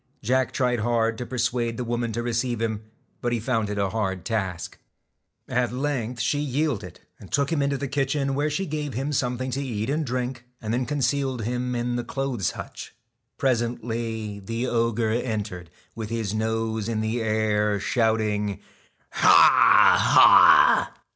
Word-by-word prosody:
Jack 130 Hz, +3 st, +1 dB
tried 125 Hz, -3 st, 0 dB
hard 115 Hz, 0 st, +1 dB
to 125 Hz, -, -5 dB
persuade 120 Hz, -2 st, -1 dB
the 125 Hz, -, -3 dB
woman 120 Hz, -1 st, -2 dB
to 120 Hz, +2 st, -3 dB
receive 120 Hz, 0 st, -1 dB
him, 110 Hz, -2 st, -2 dB, 0.4 s
but 120 Hz, -, -1 dB
he 120 Hz, -, 0 dB
found 110 Hz, -2 st, -1 dB
it 105 Hz, -, -4 dB
a 100 Hz, -2 st, 0 dB
hard 95 Hz, -5 st, -3 dB
task. 95 Hz, -6 st, -3 dB, 0.7 s
At 125 Hz, -2 st, 0 dB
length 125 Hz, -3 st, -3 dB
she 130 Hz, +6 st, 0 dB
yielded, 135 Hz, -, -2 dB, 0.2 s
and 95 Hz, -, -14 dB
took 140 Hz, +2 st, 0 dB
him 160 Hz, -3 st, +1 dB
into 140 Hz, 0 st, 0 dB
the 140 Hz, -, -4 dB
kitchen, 140 Hz, 0 st, -1 dB
where 145 Hz, +2 st, 0 dB
she 170 Hz, +6 st, -2 dB
gave 150 Hz, -, -4 dB
him 135 Hz, +4 st, -2 dB
something 130 Hz, -1 st, -1 dB
to 135 Hz, +3 st, -2 dB
eat 115 Hz, -3 st, -3 dB
and 155 Hz, +2 st, 0 dB
drink, 125 Hz, -1 st, -3 dB, 0.2 s
and 110 Hz, -1 st, -4 dB
then 125 Hz, 0 st, -1 dB
concealed 135 Hz, -3 st, -1 dB
him 125 Hz, +2 st, -2 dB
in 120 Hz, 0 st, -2 dB
the 120 Hz, -, -3 dB
clothes 125 Hz, -, -2 dB
hutch. -, -, -9 dB, 0.4 s
Presently 115 Hz, -4 st, -2 dB
the 115 Hz, +5 st, -4 dB
ogre 115 Hz, -2 st, 0 dB
entered, 105 Hz, -7 st, -3 dB, 0.2 s
with 110 Hz, -2 st, -6 dB
his 115 Hz, -3 st, -3 dB
nose 110 Hz, 0 st, -2 dB
in 110 Hz, -2 st, -1 dB
the 110 Hz, +2 st, -2 dB
air, 105 Hz, -1 st, 0 dB
shouting: 105 Hz, -2 st, 0 dB, 0.2 s
' -, -, -38 dB
Ha! -, -, +4 dB, 0.7 s
Ha -, -, +6 dB
120 Hz, 165 wpm, -24 LUFS, 110-130 Hz, 0.7 s, Ha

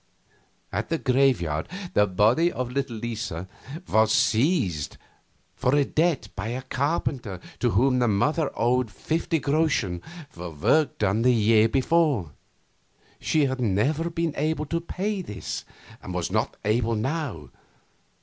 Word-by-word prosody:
At -, -, -3 dB
the 165 Hz, -, +1 dB
graveyard 125 Hz, -, +1 dB, 0.2 s
the 105 Hz, 0 st, +4 dB
body 110 Hz, -, +3 dB
of 125 Hz, -5 st, -4 dB
little 135 Hz, -2 st, -2 dB
Lisa 110 Hz, -6 st, -4 dB, 0.4 s
was 110 Hz, 0 st, +3 dB
seized 110 Hz, -, +1 dB, 0.6 s
for 140 Hz, +2 st, +2 dB
debt 160 Hz, +1 st, +1 dB
by 100 Hz, +2 st, -4 dB
a 125 Hz, +3 st, -4 dB
carpenter 130 Hz, -, -2 dB, 0.2 s
to -, -, +2 dB
whom 125 Hz, +6 st, +3 dB
the 120 Hz, -, +3 dB
mother 145 Hz, +9 st, +1 dB
owed 125 Hz, +1 st, +1 dB
fifty 160 Hz, +7 st, -1 dB
groschen 140 Hz, -, 0 dB, 0.3 s
for 90 Hz, -7 st, -8 dB
work 110 Hz, -, +1 dB
done 105 Hz, +1 st, +1 dB
the 125 Hz, +2 st, +5 dB
year 110 Hz, -1 st, +4 dB
before. 135 Hz, -, +2 dB, 0.9 s
She 155 Hz, -2 st, +2 dB
had 130 Hz, -1 st, -2 dB
never 130 Hz, -, +1 dB
been 165 Hz, -2 st, -1 dB
able 155 Hz, +1 st, 0 dB
to 170 Hz, +3 st, -2 dB
pay 195 Hz, +4 st, -3 dB
this, 105 Hz, -, -6 dB, 0.4 s
and -, -, -7 dB
was -, -, -2 dB
not -, -, -1 dB
able 115 Hz, +2 st, +1 dB
now. 115 Hz, -, -3 dB
125 Hz, 135 wpm, -25 LUFS, 105-155 Hz, 0.9 s, the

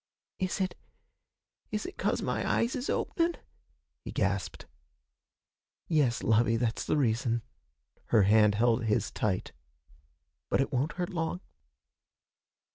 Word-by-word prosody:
'Is 185 Hz, +1 st, -1 dB
it 185 Hz, -2 st, 0 dB, 1.0 s
is 210 Hz, -, -3 dB
it 375 Hz, -, -7 dB
'cause -, -, 0 dB
my -, -, -1 dB
eyes 235 Hz, +4 st, +1 dB
is 260 Hz, 0 st, -3 dB
openin'?' 335 Hz, 0 st, 0 dB, 0.7 s
he -, -, -6 dB
gasped. -, -, -1 dB, 1.2 s
'Yes, 145 Hz, -8 st, +2 dB
lovey, 115 Hz, 0 st, +3 dB
that's 115 Hz, -1 st, -1 dB
the -, -, +1 dB
reason.' 115 Hz, -3 st, +1 dB, 0.6 s
Her 110 Hz, -4 st, +4 dB
hand 105 Hz, +1 st, +5 dB
held 115 Hz, +1 st, +2 dB
his 105 Hz, -1 st, +1 dB
tight. 95 Hz, -4 st, -1 dB, 1.0 s
'But -, -, +2 dB
it 135 Hz, -, 0 dB
won't 130 Hz, +5 st, 0 dB
hurt 180 Hz, -1 st, -3 dB
long.' 165 Hz, +1 st, -2 dB
125 Hz, 120 wpm, -30 LUFS, 115-180 Hz, 1.2 s, hand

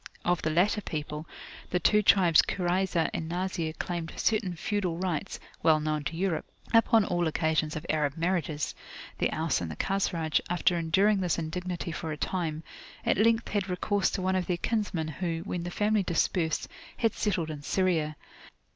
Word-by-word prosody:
Of 175 Hz, -1 st, +2 dB
the 155 Hz, -, 0 dB
latter 190 Hz, +7 st, +2 dB
people, 150 Hz, -2 st, -5 dB, 0.4 s
the 180 Hz, -, +1 dB
two 210 Hz, +5 st, +4 dB
tribes 180 Hz, -5 st, +6 dB
Kurayzah 180 Hz, -2 st, 0 dB
and 160 Hz, -, -3 dB
Nazir 175 Hz, -2 st, -2 dB
claimed 170 Hz, -1 st, -4 dB
certain 210 Hz, -5 st, 0 dB
feudal 180 Hz, -1 st, -1 dB
rights 180 Hz, -4 st, -2 dB, 0.2 s
(well 155 Hz, -1 st, +5 dB
known 155 Hz, -1 st, -1 dB
to 165 Hz, -, -3 dB
Europe) 180 Hz, -3 st, 0 dB, 0.3 s
upon 225 Hz, -2 st, +5 dB
all 175 Hz, -3 st, 0 dB
occasions 160 Hz, -1 st, 0 dB
of 155 Hz, -, -5 dB
Arab 150 Hz, -1 st, 0 dB
marriages. 165 Hz, -3 st, -1 dB, 0.5 s
The -, -, +1 dB
Aus 160 Hz, -, 0 dB
and 85 Hz, -, -3 dB
the 80 Hz, -, -6 dB
Khazraj, 170 Hz, -, 0 dB
after 175 Hz, +1 st, +2 dB
enduring 190 Hz, +5 st, +3 dB
this 180 Hz, -3 st, 0 dB
indignity 175 Hz, +2 st, -3 dB
for 160 Hz, 0 st, -4 dB
a 150 Hz, -, -4 dB
time, 165 Hz, -3 st, -2 dB, 0.4 s
at -, -, +3 dB
length 230 Hz, +1 st, +3 dB
had 200 Hz, -2 st, -1 dB
recourse 190 Hz, +2 st, +1 dB
to 185 Hz, -, -2 dB
one 190 Hz, 0 st, +1 dB
of 185 Hz, -1 st, 0 dB
their 180 Hz, -2 st, 0 dB
kinsmen 195 Hz, -6 st, -1 dB
who, 165 Hz, +1 st, -3 dB
when 180 Hz, -, -3 dB
the 175 Hz, -, -4 dB
family 210 Hz, +3 st, +1 dB
dispersed, 170 Hz, -2 st, 0 dB, 0.3 s
had 225 Hz, -3 st, +2 dB
settled 175 Hz, -7 st, -1 dB
in 150 Hz, -2 st, -7 dB
Syria. 160 Hz, -2 st, +1 dB
175 Hz, 175 wpm, -29 LUFS, 160-190 Hz, 0.5 s, tribes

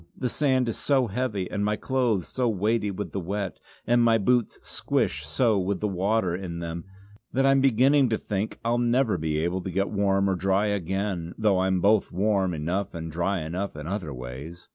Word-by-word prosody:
The 125 Hz, -, -1 dB
sand 130 Hz, -2 st, +1 dB
is 115 Hz, -, -3 dB
so 135 Hz, -3 st, +2 dB
heavy, 105 Hz, -4 st, -2 dB
and 100 Hz, -1 st, -1 dB
my 105 Hz, +1 st, +1 dB
clothes 120 Hz, -5 st, 0 dB
are -, -, -12 dB
so 125 Hz, -2 st, -1 dB
weighty 105 Hz, +1 st, 0 dB
with 100 Hz, +1 st, -5 dB
the 100 Hz, -, -3 dB
wet, 95 Hz, +1 st, -4 dB, 0.3 s
and 120 Hz, 0 st, +3 dB
my 115 Hz, -1 st, +5 dB
boots 120 Hz, +2 st, +1 dB
squish 75 Hz, 0 st, -1 dB
so 105 Hz, -, +2 dB
with 95 Hz, +1 st, -1 dB
the 105 Hz, -, 0 dB
water 95 Hz, -1 st, 0 dB
in 90 Hz, -2 st, -5 dB
them 85 Hz, 0 st, -5 dB, 0.5 s
that 135 Hz, +1 st, +2 dB
I'm 135 Hz, 0 st, +4 dB
beginning 135 Hz, +1 st, +4 dB
to 110 Hz, -, +1 dB
think 105 Hz, +1 st, -3 dB
I'll 120 Hz, +1 st, +2 dB
never 120 Hz, 0 st, +2 dB
be 75 Hz, -1 st, -1 dB
able 85 Hz, +4 st, -1 dB
to 95 Hz, -, -5 dB
get 100 Hz, +2 st, -1 dB
warm 100 Hz, -1 st, +2 dB
or 95 Hz, -, +2 dB
dry 95 Hz, +3 st, +1 dB
again; 95 Hz, -2 st, -2 dB
though 105 Hz, -4 st, +2 dB
I'm 95 Hz, -1 st, +1 dB
both 105 Hz, +2 st, +3 dB
warm 95 Hz, 0 st, +1 dB
enough 85 Hz, +6 st, -2 dB
and 80 Hz, -1 st, -5 dB
dry 90 Hz, +3 st, -1 dB
enough 90 Hz, +5 st, -4 dB
in 75 Hz, 0 st, -7 dB
other 90 Hz, -3 st, -3 dB
ways." 65 Hz, +7 st, -8 dB
100 Hz, 205 wpm, -26 LUFS, 90-115 Hz, 0.5 s, my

